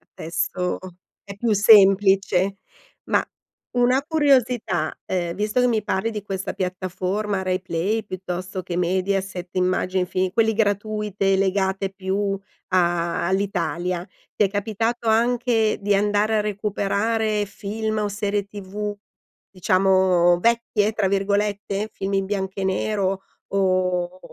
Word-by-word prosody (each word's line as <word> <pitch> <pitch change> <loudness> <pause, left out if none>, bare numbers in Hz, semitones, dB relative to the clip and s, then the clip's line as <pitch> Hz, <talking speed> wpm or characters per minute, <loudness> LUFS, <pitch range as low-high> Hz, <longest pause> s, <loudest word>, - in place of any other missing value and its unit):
Adesso 180 +2 -2 0.4
è 200 -1 -9
più 220 +1 +1
semplice. 195 -2 +5 0.5
Ma, - - +2 0.5
una 250 +2 +3
curiosità, 250 - +1
ehm, 175 -2 -2
visto 210 +4 0
che 250 - +4
mi 220 -3 +1
parli 210 +3 -1
di 210 -2 -5
questa 195 -2 -4
piattaforma 185 +2 -2
RaiPlay, 185 +3 -1
piuttosto 185 0 -5
che 175 0 -4
Mediaset, 185 0 -1
immagi 185 0 +1
i 180 - +1
film 185 +1 -1
quelle 225 0 +2
gratuite 205 -2 0
legati 195 0 0
più 195 +1 -1 0.3
a 175 -2 +1
all'Italia, 180 -2 -1 0.3
ti 210 - +3
è - - -1
capitato 225 +3 -2
anche 235 -1 +2
di 205 0 +1
andare 210 +2 +2
a - - +2
recuperare 210 +1 0
film 215 +2 -4
o 210 -1 0
serie 205 -1 -2
TV, 205 +1 -5 0.5
diciamo, 185 -1 +3
"vecchie", 225 -1 +1
tra 205 -3 +1
virgolette, 200 +1 -1
film 195 -1 -4
in 195 0 +1
bianco 195 -1 -3
e - - -1
nero, 195 0 -1 0.2
o 185 -2 0
195 Hz, 125 wpm, -23 LUFS, 185-210 Hz, 0.5 s, semplice